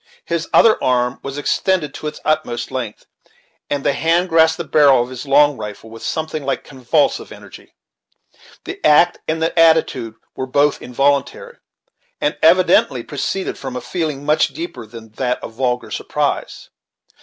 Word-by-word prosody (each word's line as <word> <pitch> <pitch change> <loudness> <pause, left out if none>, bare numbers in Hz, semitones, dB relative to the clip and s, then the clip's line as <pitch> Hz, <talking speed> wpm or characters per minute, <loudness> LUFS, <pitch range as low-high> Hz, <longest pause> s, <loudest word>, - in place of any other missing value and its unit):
His 170 -1 -3
other 225 -1 +5
arm 125 -1 +1
was 140 0 -6
extended 155 0 0
to 155 - -6
its 150 - -6
utmost 150 -7 -1
length, 120 -5 -5 0.6
and 145 -1 -2
the 140 - +2
hand 170 +5 +1
grasped 160 -1 +4
the 170 - -3
barrel 140 -5 +4
of 125 - -10
his 130 +2 -8
long 145 0 +4
rifle 105 +1 -8
with 115 - -11
something 155 -1 -3
like 135 - -2
convulsive 130 -3 -1
energy. - - -14 0.9
The - - -8
act 155 +4 +4
and 160 0 -1
the 165 +1 0
attitude 160 -9 +3 0.2
were 130 - -4
both 145 +2 +1
involuntary, 145 - -1 0.6
and - - 0
evidently - - +4
proceeded 195 -1 -4
from 130 -2 -6
a - - -2
feeling 155 -5 -4
much 150 +1 +3
deeper 325 - -8
than 110 0 -12
that 125 -2 -1
of - - -7
vulgar 125 0 -2
surprise. - - -3
145 Hz, 155 wpm, -18 LUFS, 125-160 Hz, 0.9 s, other